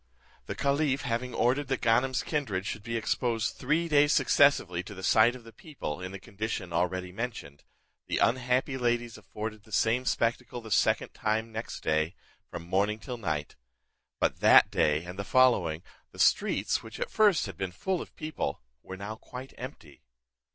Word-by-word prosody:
The -, -, -4 dB
caliph 140 Hz, 0 st, +1 dB
having 125 Hz, 0 st, -2 dB
ordered 130 Hz, +4 st, +1 dB
that 135 Hz, -1 st, -1 dB
Ganem's 125 Hz, +3 st, +2 dB
kindred 110 Hz, -, -2 dB
should 105 Hz, -, -4 dB
be 115 Hz, +2 st, -3 dB
exposed 115 Hz, 0 st, -1 dB
three 165 Hz, +3 st, 0 dB
days 145 Hz, -2 st, +4 dB
successively 110 Hz, -16 st, +4 dB
to 100 Hz, +3 st, -10 dB
the 95 Hz, -, -9 dB
sight 110 Hz, +5 st, +5 dB
of 125 Hz, -, -11 dB
the 115 Hz, 0 st, -14 dB
people, 135 Hz, -, -6 dB
in 90 Hz, 0 st, -5 dB
the 95 Hz, -, -6 dB
condition 100 Hz, -3 st, -5 dB
already 90 Hz, +1 st, -1 dB
mentioned, 100 Hz, -, -6 dB, 0.4 s
the -, -, -1 dB
unhappy 130 Hz, +2 st, +1 dB
ladies 120 Hz, -1 st, 0 dB
afforded 105 Hz, +1 st, -6 dB
the 110 Hz, -, -20 dB
same 115 Hz, +4 st, +2 dB
spectacle 120 Hz, 0 st, -1 dB
the 110 Hz, -2 st, -11 dB
second -, -, +2 dB
time 110 Hz, +1 st, -1 dB
next 110 Hz, +1 st, -6 dB
day, 80 Hz, +2 st, 0 dB, 0.3 s
from 85 Hz, -, -7 dB
morning 100 Hz, +4 st, +1 dB
till 120 Hz, +3 st, -7 dB
night. 80 Hz, -9 st, -3 dB, 0.6 s
But -, -, 0 dB
that -, -, +7 dB
day 75 Hz, +1 st, +2 dB
and 90 Hz, +2 st, -8 dB
the -, -, -1 dB
following, 95 Hz, -10 st, +3 dB, 0.3 s
the -, -, -15 dB
streets, -, -, +2 dB
which 110 Hz, -1 st, -10 dB
at -, -, -3 dB
first 205 Hz, -, +4 dB
had 95 Hz, -4 st, -7 dB
been 95 Hz, +1 st, -3 dB
full 185 Hz, -, -2 dB
of -, -, -11 dB
people, 155 Hz, -, -3 dB, 0.2 s
were 95 Hz, -, -8 dB
now 100 Hz, +3 st, -6 dB
quite 130 Hz, +3 st, -10 dB
empty. 85 Hz, -, -10 dB
115 Hz, 175 wpm, -29 LUFS, 95-130 Hz, 0.6 s, that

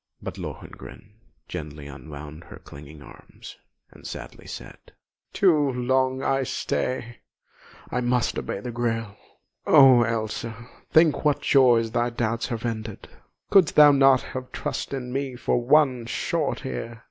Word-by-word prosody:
But -, -, -7 dB
Lohengrin 65 Hz, -, -10 dB, 0.4 s
gently 75 Hz, -1 st, -7 dB
unwound 75 Hz, +2 st, -10 dB
her -, -, -12 dB
clinging 75 Hz, +1 st, -13 dB
arms, -, -, -14 dB, 0.3 s
and -, -, -12 dB
sadly -, -, -9 dB
said: -, -, -9 dB, 0.5 s
"Too 190 Hz, -3 st, +4 dB, 0.2 s
long 130 Hz, +1 st, 0 dB
I 135 Hz, 0 st, +1 dB
stay 125 Hz, -1 st, -3 dB, 0.7 s
I 125 Hz, -, -1 dB
must 125 Hz, -1 st, 0 dB
obey 100 Hz, -, -5 dB
the 125 Hz, -, -5 dB
Grail! 115 Hz, -3 st, -2 dB, 0.5 s
Oh, 130 Hz, -3 st, +7 dB
Elsa, 115 Hz, 0 st, -3 dB, 0.2 s
think 160 Hz, -1 st, +4 dB
what 150 Hz, -2 st, +1 dB
joys 120 Hz, -5 st, +4 dB
thy 120 Hz, +1 st, 0 dB
doubts 115 Hz, -1 st, -2 dB
have 115 Hz, -2 st, -4 dB
ended! 110 Hz, -2 st, -5 dB, 0.4 s
Couldst 190 Hz, -6 st, +5 dB
thou 150 Hz, -1 st, +8 dB
not 135 Hz, -2 st, +4 dB, 0.3 s
trust -, -, -4 dB
in 125 Hz, -2 st, -5 dB
me 135 Hz, -1 st, -3 dB
for 120 Hz, 0 st, 0 dB
one 130 Hz, -3 st, +3 dB
short 155 Hz, +3 st, -2 dB
year? 115 Hz, -3 st, -5 dB
120 Hz, 135 wpm, -24 LUFS, 110-130 Hz, 0.7 s, thou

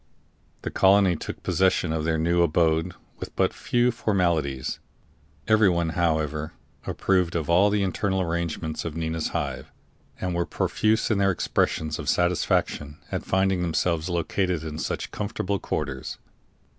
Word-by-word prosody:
The -, -, -3 dB
colony 95 Hz, -2 st, +4 dB
took -, -, -7 dB
possession 95 Hz, -3 st, +2 dB
of 80 Hz, -1 st, -2 dB
their 80 Hz, 0 st, +1 dB
new 85 Hz, +2 st, +2 dB
abode 80 Hz, +1 st, +2 dB, 0.2 s
with -, -, -7 dB
but -, -, +2 dB
few 120 Hz, 0 st, +1 dB
formalities. 85 Hz, -, 0 dB, 0.7 s
Everyone, 95 Hz, -6 st, +3 dB
however, 80 Hz, -2 st, -1 dB, 0.3 s
approved 90 Hz, -3 st, +1 dB
of 80 Hz, -1 st, -1 dB
all 95 Hz, +4 st, +5 dB
the 100 Hz, -1 st, +1 dB
internal 95 Hz, 0 st, 0 dB
arrangements 85 Hz, -2 st, -2 dB
of 80 Hz, -2 st, -5 dB
Nina's 80 Hz, -1 st, -2 dB
Hive, -, -, -4 dB, 0.5 s
and 90 Hz, -1 st, -2 dB
were 85 Hz, 0 st, -1 dB
profuse 110 Hz, +5 st, +1 dB
in 105 Hz, -, +2 dB
their 100 Hz, 0 st, +3 dB
expressions 80 Hz, -4 st, 0 dB
of 75 Hz, -, -3 dB
satisfaction 80 Hz, -4 st, 0 dB
at -, -, -2 dB
finding 95 Hz, -1 st, +1 dB
themselves 85 Hz, 0 st, 0 dB
located 90 Hz, 0 st, -1 dB
in 80 Hz, -1 st, -5 dB
such -, -, -3 dB
comfortable 100 Hz, -1 st, -2 dB
quarters. 70 Hz, -4 st, -4 dB
85 Hz, 140 wpm, -25 LUFS, 80-95 Hz, 0.7 s, all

